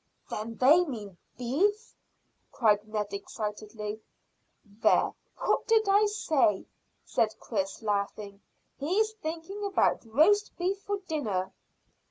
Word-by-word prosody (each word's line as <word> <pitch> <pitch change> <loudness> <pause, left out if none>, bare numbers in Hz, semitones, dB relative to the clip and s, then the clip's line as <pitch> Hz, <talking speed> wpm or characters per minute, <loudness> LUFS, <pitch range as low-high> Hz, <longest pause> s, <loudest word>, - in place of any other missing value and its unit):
"Then 225 +2 -4
they 295 +10 +6
mean 210 - -7 0.2
beef," 400 - 0 0.6
cried 210 -3 +2
Ned 210 -2 -3
excitedly. 210 +1 -5 0.6
"There, 205 +1 +2 0.2
what - - 0
did 445 -2 +4
I 405 +2 +5
say?" 290 - +1 0.4
said 220 -1 +1
Chris, 195 -1 -3
laughing. 200 -1 -2 0.4
"He's 390 +10 +1
thinking 380 0 -6
about 400 -1 +2
roast 410 - +4
beef 380 +2 -1
for 405 0 -2
dinner." 215 - -2
245 Hz, 110 wpm, -29 LUFS, -, 0.6 s, they